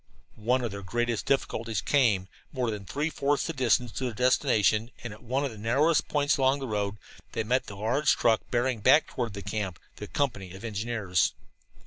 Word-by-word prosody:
One 125 +3 +2
of 120 - -2
their 100 0 -6
greatest 120 +3 -2
difficulties 115 -6 0
came 115 -5 +3 0.3
when, 130 - -10
more 120 -2 +1
than 105 -2 -6
three 145 - -2
fourths 140 0 0
the 165 - -3
distance 125 -3 +2
to 130 - -3
their 120 - -2
destination, 120 -3 +2
and 120 -3 -5
at 105 - -14
one 130 +4 -1
of 135 - -3
the 110 - -11
narrowest 140 +9 +2
points 145 0 +2
along 135 0 +3
the 135 - -4
road, 105 -2 -2 0.4
they - - -1
met 125 +4 0
the 100 - -8
large 115 +9 +2
truck 115 -2 +3
bearing 120 -1 0
back 135 +9 +5
toward 120 -4 -4
camp 100 -5 -3 0.2
the 105 - -7
company 95 -11 -2
of 95 - -11
engineers. 105 -4 0
120 Hz, 195 wpm, -28 LUFS, 105-130 Hz, 0.4 s, back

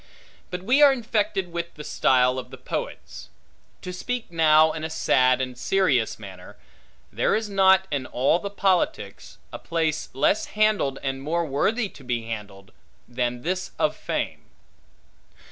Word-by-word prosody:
But 180 -1 -5
we 255 +8 +3
are 290 -1 +8
infected 210 -7 -1
with 170 0 -5
the 150 - -8
style 125 -2 +2
of 130 - -9
the - - -10
poets. - - -6 0.5
To 180 - -6
speak 245 +3 -4
now 160 -1 +5
in 155 - -6
a 160 - -3
sad 130 -4 +2
and 130 -1 -3
serious 130 - +1
manner: 95 -4 -12 0.6
There - - +1
is 215 -1 -3
not, 190 -1 +4
in 135 -3 -2
all 135 +7 +1
the 200 - -5
politics, 195 -3 -1 0.2
a - - -6
place 160 -2 -2
less 145 +10 +2
handled 210 -11 +2
and 135 -1 -3
more 165 +4 -1
worthy 205 - 0
to 140 - -15
be 120 -2 -2
handled, 105 -4 -8 0.4
than 120 0 -3
this 185 +3 -3
of - - +1
fame. - - -4
160 Hz, 155 wpm, -24 LUFS, 130-190 Hz, 0.6 s, are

